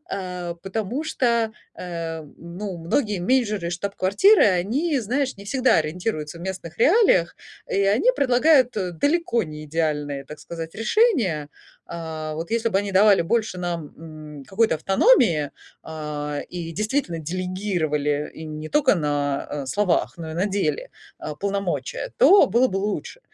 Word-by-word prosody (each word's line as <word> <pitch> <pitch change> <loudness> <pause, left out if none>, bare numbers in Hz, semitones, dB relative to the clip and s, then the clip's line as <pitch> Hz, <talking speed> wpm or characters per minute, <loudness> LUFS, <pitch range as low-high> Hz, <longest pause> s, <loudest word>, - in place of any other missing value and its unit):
А, 180 -3 -4
потому 220 +8 -3
что, 235 -7 +1 0.2
э, 165 -2 -5
ну, 180 +3 -7
многие 205 - 0
менеджеры 210 -3 +1
из 170 - -3
штаб-квартиры, 200 - +3
они, 240 - +1
знаешь, 260 +4 -1
не 200 - -11
всегда 255 -1 +3
ориентируются 155 0 -3
в - - -11
местных 180 -2 -6
реалиях, 295 - +4 0.3
и 200 - 0
они 210 - +3
предлагают 255 0 +4 0.3
далеко 305 -6 +2
не 155 -2 -8
идеальные, 150 -3 -2
так 150 +2 -10
сказать, 165 -1 -7
решения. 225 - +2 0.4
А, 160 -2 -6
вот 165 +6 -5
если 230 0 +1
бы 195 - +1
они 200 -1 -3
давали 200 -1 +5
больше 215 +1 -1
нам, 170 -4 -4
м, 155 -3 -10
какой-то 195 -4 +2
автономии, 190 - +3 0.3
а, 150 -2 -5
и 170 -2 -6
действительно 215 - -2
делегировали 160 -4 -2
и 160 - -9
не 155 0 -6
только 295 -5 +3
на, 145 -4 -1
э, 140 -2 -4
словах, 185 +4 0
но 160 -2 -7
и - - -6
на 185 +4 0
деле, 190 -8 -1 0.3
а, 150 - -6
полномочия, 200 - -3
то 405 -4 +7
было 250 +2 +3
бы 190 - -3
лучше. 210 - -4
185 Hz, 145 wpm, -23 LUFS, 160-225 Hz, 0.4 s, то